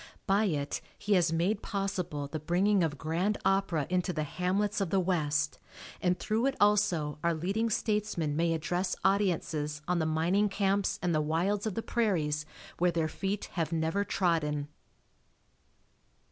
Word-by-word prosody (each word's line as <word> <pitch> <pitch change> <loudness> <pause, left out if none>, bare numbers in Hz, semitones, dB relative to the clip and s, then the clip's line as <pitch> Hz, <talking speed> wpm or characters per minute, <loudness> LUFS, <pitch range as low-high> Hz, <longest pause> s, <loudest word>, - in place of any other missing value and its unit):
By 205 +1 +3
it 150 -7 -1 0.2
he 205 - 0
has 175 -3 +3
made 185 +6 +1
possible 180 -7 -3
the 155 +2 -4
bringing 180 +5 +2
of 155 -3 -1
grand 170 +8 0
opera 195 -6 +2
into 180 0 0
the 155 -3 -2
hamlets 195 +7 -1
of 195 - 0
the 195 - +2
West, 155 -4 0 0.4
and 180 0 +2
through 225 +4 0
it 270 - 0
also 185 -8 +2
our 170 -1 +2
leading 200 +8 0
statesmen 210 -8 -1
may 165 +1 +2
address 175 +4 -1
audiences 160 -6 0
on 180 -1 +1
the 160 - +1
mining 175 +7 +2
camps 200 0 +1
and 175 -1 +1
the 155 - +2
wilds 180 +8 0
of 210 - -3
the 225 - -2
prairies 155 -10 0 0.3
where 180 +1 +4
their 165 -1 0
feet 195 +5 -3
have 165 -3 -1
never 165 +4 0
trodden. 150 -7 0
180 Hz, 160 wpm, -30 LUFS, 160-200 Hz, 0.4 s, where